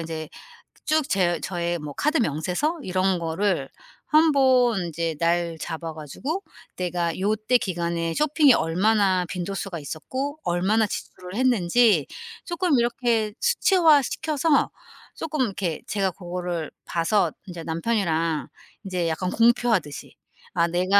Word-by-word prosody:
인제 160 -1 -5 0.6
쭉 310 -2 +1
제 175 -4 +1
저의 175 -2 -2
뭐 150 -1 -7
카드 300 - +1
명세서 190 - -1
이런 185 0 +1
거를 165 -2 -1 0.4
한번 260 - +4
이제 165 0 -2
날 170 0 +1
잡아 160 +1 -5
가지고 255 - -5 0.3
내가 175 -2 -2
요때 215 +5 +2
기간에 170 -4 -2
쇼핑이 300 - +4
얼마나 190 +2 +2
빈도수가 185 0 -4
있었고 260 - -5
얼마나 195 +6 +2
지출을 185 -1 -7
했는지 225 - +3 0.4
쪼끔 345 -4 +1
이렇게 235 -3 0
수치화시켜서 320 - +3 0.5
쪼끔 310 -3 -3
이렇게 190 -8 -2
제가 195 -3 0
고거를 175 -2 -4 0.2
봐서 175 +5 +1 0.2
이제 175 -3 -7
남편이랑 165 -3 -1 0.4
이제 180 -3 -1
약간 165 +3 -1
공표하듯이 230 - +1 0.4
아 170 -1 +2
내가 185 +4 +3
190 Hz, 275 characters per minute, -24 LUFS, 170-245 Hz, 0.6 s, 한번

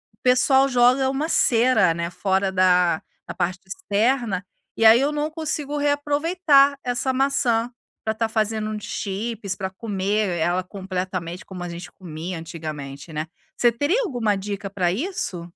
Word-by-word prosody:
o - - -54
pessoal 265 +2 +4
joga 255 +1 +4
uma 280 +4 -1
cera, 235 - +4
né, 170 0 -3
fora 190 +1 0
da 180 -3 +3 0.3
da - - -5
parte 180 +1 -2
externa, 215 - 0 0.3
e 225 - +2
aí 225 +2 +8
eu 285 - +1
não 300 +1 -2
consigo 300 -2 -3
reaproveitar 290 0 +3
essa 250 +1 0
maçã 255 -3 +1 0.3
para 220 - +1
estar 225 0 -1
fazendo 215 -1 -1
um 215 - -3
chips, 205 0 -4
para 190 -2 -4
comer 200 -2 -1
ela 175 +3 +1
completamente 185 -2 -5
como 180 -2 -8
a 175 - -5
gente 170 +1 -8
comia 170 0 -7
antigamente, 155 -3 -7
né. 155 0 -3 0.3
Você 240 -1 +4
teria 295 - +1
alguma 235 - 0
dica 200 0 -5
para 185 -3 0
isso? 240 - -3
215 Hz, 155 wpm, -23 LUFS, 185-265 Hz, 0.3 s, aí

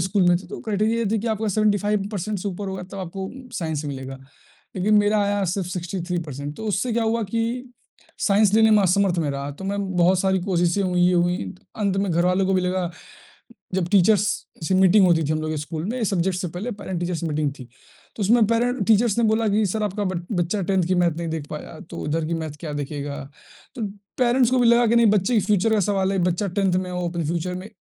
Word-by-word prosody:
School 190 +3 +1
में 175 - +5
थे, 190 - -13
तो - - -7
क्राइटेरिया 215 +2 0
ये 230 - 0
थी 220 - +1
कि 235 - -5
आपका 220 0 -1
75 205 0 +1
परसेंट 205 +1 -3
से 200 +3 -3
ऊपर 195 +1 -5
होगा 190 -1 -5
तब 195 - -6
आपको 190 +1 -5 0.3
साइंस 160 -5 -3
मिलेगा। 135 -1 -6 0.6
लेकिन 205 +4 +2
मेरा 205 +1 +3
आया 200 0 0
सिर्फ 185 +1 -2
63 175 0 -3
परसेंट, 145 0 -6
तो 220 - -7
उससे 210 +4 0
क्या 235 - +1
हुआ 230 +1 0
कि 230 +4 -3 0.5
साइंस 200 0 +3
लेने 220 0 +5
में 210 -2 +5
असमर्थ 185 -1 +2
मैं 150 -3 0
रहा, 140 0 -4
तो 145 +7 -9
मैं 200 +1 -2 0.2
बहुत 180 +1 +4
सारी 190 -1 +1
कोशिशें 175 0 +1
हुई, 180 -1 0
ये 180 - +2
हुई, 175 - 0 0.2
अंत 200 -3 0
में 195 -1 0
घर 170 +2 +2
वालों 185 +1 +2
को 195 - +1
भी 185 - +3
लगा, 180 -1 -1 0.8
जब 180 -2 0
टीचर्स 205 +1 +4 0.4
से 190 - +2
मीटिंग 190 +1 +6
होती 165 -2 +3
थी 155 - 0
हम 155 - -1
लोगों 155 - -3
के - - -3
स्कूल 155 +1 -5
में, 240 +4 -3
सब्जेक्ट 185 -2 0
से 180 -2 -3
पहले 185 +9 -5
पैरेंट 190 -4 -5
टीचर्स 175 -1 -2
मीटिंग 150 -2 -1
थी। 130 - -8 0.5
तो 215 - -3
उसमें 220 +2 +4
पैरेंट 245 +2 +1
टीचर्स 220 -1 +3
ने 235 - +3
बोला 220 +1 +2
कि 210 +2 +2
सर 215 +3 -2
आपका 205 0 -2
बच 185 -2 -1
बच्चा 175 +3 0
10th 190 -3 +2
की 185 - +2
मैथ 170 -3 +2
नहीं 170 - -3
देख 160 -2 -4
पाया, 155 +1 -7
तो - - -8
इधर 160 +1 -1
की 170 - -2
मैथ 160 -1 -3
क्या 155 -3 -5
देखेगा? 145 0 -4 0.6
तो 240 - -5 0.4
पैरेंट्स 250 0 +3
को 255 - +2
भी 245 - +4
लगा 235 0 +5
कि 230 - +2
नहीं 235 - +5
बच्चे 210 +4 +2
के 215 - +4
फ्यूचर 210 +1 +2
का 210 - +2
सवाल 195 0 +1
है, 195 - 0
बच्चा 180 +3 0
10th 190 -2 +2
में 185 -1 -2
हो, 180 -1 -2
अपने 170 -1 -3
फ्यूचर 175 +2 -2
में 185 +3 -7
190 Hz, 240 wpm, -23 LUFS, 175-210 Hz, 0.8 s, मीटिंग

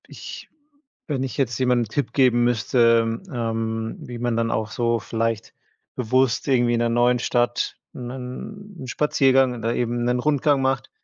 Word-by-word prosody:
Ich - - -9 0.6
wenn 135 -4 -1
ich 135 - -5
jetzt 120 -5 0
jemandem 125 -2 +2
'n - - -16
Tipp 140 +5 -2
geben 125 -3 +4
müsste, 115 -1 +3
ähm, 115 -2 -2
wie 120 -1 -8
man 120 -1 -1
dann 115 0 0
auch 110 -1 -2
so 115 -1 0
vielleicht 115 +3 -2 0.4
bewusst 130 +1 +1
irgendwie 120 -3 +3
in - - 0
'ner 120 - +2
neuen 120 +1 +3
Stadt 120 0 0 0.2
'nen 130 - -8
'n - - -7
Spaziergang 135 -1 +3
oder 115 +1 -1
eben 120 0 -1
'nen 125 0 +1
Rundgang 145 0 +2
macht, 135 0 0
120 Hz, 165 wpm, -23 LUFS, 115-130 Hz, 0.6 s, geben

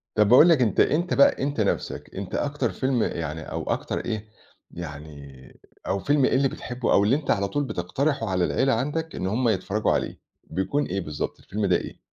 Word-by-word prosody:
طَب 105 -1 +4
باقول 145 +8 +8
لك 155 -6 +4
أنت 110 -5 +1
أنت 170 +4 +2
بقى 280 - +4
أنت 140 -5 -1
نَفْسك 100 - -2
أنت 95 -1 -5
أكتر 145 0 -1
فيلم 130 -3 0
يعني 80 -1 -3
أو - - -3
أكتر - - -2
إيه، 110 -2 -4 0.4
يعني 75 -5 -10 0.3
أو 100 - 0
فيلم 145 +3 +2
إيه - - +2
اللي 135 +1 +3
بتحبه 125 -1 -3
أو 100 - +5
اللي 115 +7 +3
أنت 150 -1 -1
على 100 0 +1
طول 145 +8 -1
بتقترحه 115 - -1
على 90 -1 +1
العيلة 135 -1 +1
عندك 150 +7 -2
إن 95 - -2
هُم 115 +4 +1
يتفرّجوا 105 +1 0
عليه، - - -2 0.2
بيكون 95 - -1
إيه 95 +2 -2
بالضبط 75 -3 -5
الفيلم 105 +1 -3
ده 90 -2 +3
إيه؟ - - -4
110 Hz, 200 wpm, -25 LUFS, 95-140 Hz, 0.4 s, باقول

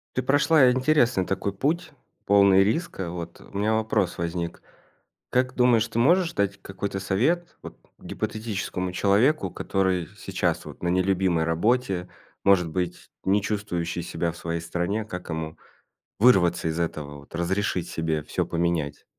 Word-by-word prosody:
Ты 130 - +1
прошла 145 0 +5
интересный 130 -6 +2
такой 95 +1 -2
путь, 160 - -1 0.3
полный 100 -1 +6
риска. 105 - -2
Вот, 85 -1 -7
у 100 - -10
меня 110 +2 +1
вопрос 110 -4 0
возник. 85 0 -3 0.7
Как 130 0 +1
думаешь, 120 -3 +3
ты 115 - -3
можешь 170 +7 +3
дать 100 -1 -1
какой-то 95 0 -4
совет, 145 - 0
вот, - - -10 0.2
гипотетическому 100 -4 -4
человеку, 105 +11 +2
который 95 -3 0
с - - -21
сейчас, - - -1
вот, - - -11
на 85 - 0
нелюбимой 90 -2 +2
работе, 95 +2 0 0.4
может 95 -4 +4
быть, 90 +1 -4
не 100 +2 +3
чувствующий 90 -5 -2
себя 85 0 -2
в 85 - -10
своей 85 -1 -3
стране, 90 +6 -2
как 90 -4 -7
ему 80 0 -4 0.6
вырваться 95 -9 +4
из 80 +1 -2
этого, 75 -4 -4
вот, 70 +3 -12
разрешить 90 +1 -1
себе 80 -2 -2
всё - - -1
поменять? 85 -4 -1
95 Hz, 145 wpm, -25 LUFS, 85-110 Hz, 0.7 s, полный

